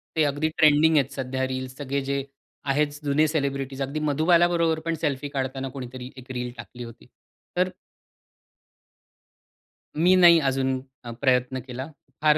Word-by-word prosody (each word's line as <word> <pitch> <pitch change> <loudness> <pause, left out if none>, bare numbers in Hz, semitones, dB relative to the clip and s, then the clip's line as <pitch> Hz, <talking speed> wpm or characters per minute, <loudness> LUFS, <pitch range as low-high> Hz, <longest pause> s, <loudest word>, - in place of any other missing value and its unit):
ते 160 - +3
अगदी 145 +2 0
ट्रेंडिंग 155 +1 +5
आहेत 140 -1 +2
सध्या 130 -1 -2
रील्स 130 0 -5
सगळे 140 -1 -2
जे 140 0 -1 0.5
आहेत, 150 +2 +2 0.2
जुने 150 +2 +3
सेलिब्रिटीज 140 -3 -2
अगदी 140 +3 -2
मधुबालाबरोबर 165 +2 +3
पण 165 0 0
सेल्फी 145 -2 -1
काढताना 135 -1 -3
कोणीतरी 130 -1 -8
1 130 0 -10
रील 125 -1 -3
टाकली 120 +2 -9
होती. 115 0 -12 0.5
तर 180 +1 +3 2.3
मी 175 +4 +4
नाही 175 -2 +8
अजून 135 -2 0 0.2
अ, 120 - -7
प्रयत्न 130 -1 +2
केला. 130 +3 -5 0.3
फार 155 0 +5
140 Hz, 140 wpm, -25 LUFS, 130-155 Hz, 2.3 s, नाही